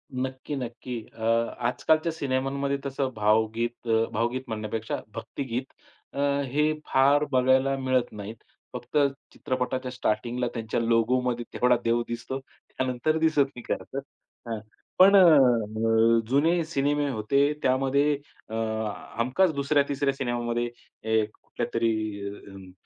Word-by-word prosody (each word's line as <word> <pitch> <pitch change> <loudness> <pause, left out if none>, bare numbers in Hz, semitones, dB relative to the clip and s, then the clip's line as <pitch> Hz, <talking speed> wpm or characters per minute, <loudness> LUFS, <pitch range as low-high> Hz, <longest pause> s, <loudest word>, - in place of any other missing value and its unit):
नक्की, 130 +3 -3
नक्की. 125 -1 -5
अ, 115 - -14 0.5
आजकालच्या 155 +6 +1
सिनेमांमध्ये 140 -1 -1
तसं 135 -1 -1
भावगीत 110 +3 0
अ, 115 0 +3
भावगीत 120 +4 -1
म्हणण्यापेक्षा 110 0 -3
भक्तिगीत 125 +2 -5 0.4
अ, - - -5 0.3
हे 150 +4 +1
फार 140 +2 +4
बघायला 130 +1 +3
मिळत 130 -2 0
नाहीत. 105 +1 -7 0.4
फक्त 120 - -4 0.4
चित्रपटाच्या 130 -1 -2
स्टार्टिंगला 120 0 -1
त्यांच्या 115 -1 -2
लोगोमध्ये 120 +1 +1
तेवढा 125 0 +3
देव 115 +1 +2
दिसतो. 120 +3 -4
त्यानंतर 130 +2 -3
दिसत 160 -2 +3
नाही 120 - -8
खर - - -5
तर. 135 - -1 0.5
हां, 115 -2 -3 0.4
पण 195 +2 +8
अ, - - +9
अ, 115 -6 +4
जुने 165 +6 +3
सिनेमे 145 -1 0
होते 125 +3 +1 0.2
त्यामध्ये 135 +3 +2 0.4
अ, - - -8 0.6
हमखास 130 +10 +2
दुसऱ्या, 140 +1 +2
तिसऱ्या 140 0 0
सिनेमामध्ये 120 -2 -1 0.4
हे 110 -1 +2
कुठल्यातरी 105 -4 -4
125 Hz, 120 wpm, -26 LUFS, 115-140 Hz, 0.6 s, अ